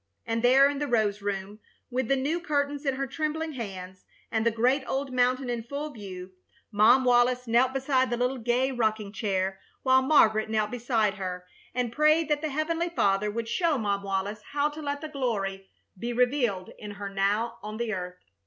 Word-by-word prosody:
And 230 0 -1
there 260 +3 +6
in 285 0 -2
the 295 - -1
rose 215 -4 +1
room, 200 +1 -4 0.3
with 255 -1 -1
the 275 - +3
new 285 +6 -1
curtains 285 -2 -1
in 270 - +1
her 275 +1 -2
trembling 315 +3 -3
hands, 190 -6 -7 0.3
and 220 -1 +1
the 230 - +4
great 250 +5 +1
old 270 +2 -2
mountain 255 +1 +2
in 240 -1 -2
full 280 +6 -5
view, 190 -6 -9 0.4
Mom 225 +5 +5
Wallis 245 0 +3
knelt 240 +2 +3
beside 265 -1 +1
the 240 - -1
little 250 +2 0
gay 245 +3 +1
rocking 215 -4 -1
chair, 190 -3 -1 0.2
while 260 0 +5
Margaret 220 -6 +4
knelt 215 -1 0
beside 225 -4 0
her 180 -1 -5 0.3
and 245 -2 -1
prayed 305 +3 +3
that 295 -1 +1
the 310 - -2
Heavenly 325 +4 -1
Father 205 -9 +1
would 225 +2 -4
show 310 +6 +1
Mom 200 -4 -1
Wallis 200 +2 -3
how 290 +1 +2
to 300 +1 -9
let 285 -1 -3
the 310 - -5
glory 200 -9 -3 0.3
be 235 +6 -4
revealed 240 -6 +1
in 210 - -7
her 205 -1 -5
now 205 +4 0
on 215 +1 -6
the 235 -2 -2
earth. 180 -1 -5
240 Hz, 190 wpm, -27 LUFS, 210-275 Hz, 0.4 s, there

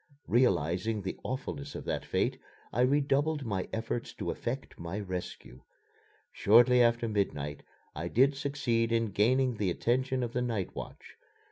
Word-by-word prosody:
Realizing 105 - +2
the 95 - -4
awfulness 140 +2 -5
of - - -6
that - - -2
fate, - - 0 0.3
I 120 - +1
redoubled 145 +2 +2
my 100 -4 -2
efforts 115 +1 -3
to - - -3
effect 130 +3 -5
my 85 +4 -4
rescue. 90 -9 -6 0.7
Shortly 120 +4 +5
after 115 0 +3
midnight 75 -9 -2 0.3
I 85 +3 -3
did 135 +9 +3
succeed 135 -5 0
in 115 -2 +1
gaining 125 +4 +2
the 100 -3 0
attention 130 +7 0
of 120 -1 -4
the 125 - 0
night 115 -7 -2
watch. - - -9
115 Hz, 145 wpm, -30 LUFS, 100-130 Hz, 0.7 s, Shortly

